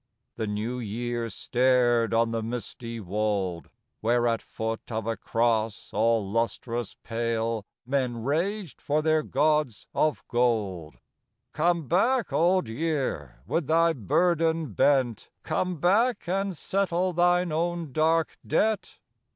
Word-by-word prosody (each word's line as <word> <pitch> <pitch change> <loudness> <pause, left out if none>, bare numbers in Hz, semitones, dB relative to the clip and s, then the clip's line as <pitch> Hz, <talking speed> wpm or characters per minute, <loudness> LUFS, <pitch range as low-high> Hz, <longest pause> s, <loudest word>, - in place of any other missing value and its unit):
" - - -53
The 110 - -2
New 110 +4 -3
Year 120 +1 -3
stared 120 +1 +2
on 115 0 +2
the 115 -1 -1
misty 115 0 -5
wold, 100 -3 -2 0.3
Where 120 +2 +2
at 115 -1 0
foot 110 +1 -5
of 110 -1 -2
a 115 0 -1
cross 115 -2 0
all 110 -1 +2
lustrous 115 +2 -2
pale 115 -2 -2 0.2
Men 125 -3 -1
raged 175 - -2
for 150 +1 0
their 155 0 +3
gods 150 -4 +1
of 155 -1 0
gold. 105 -10 0 0.3
" - - -53
Come 165 -1 +1
back, 230 - +2
Old 180 -3 +3
Year, 115 - -3
with 165 -5 -1
thy 165 +1 +4
burden 160 - +1
bent. 125 -1 +2
Come 180 +3 -1
back 205 - +2
and 195 0 -1
settle 185 0 0
thine 175 0 +3
own 170 -1 -1
dark 160 +3 +1
debt." 210 +6 0
125 Hz, 130 wpm, -27 LUFS, 115-165 Hz, 0.3 s, thy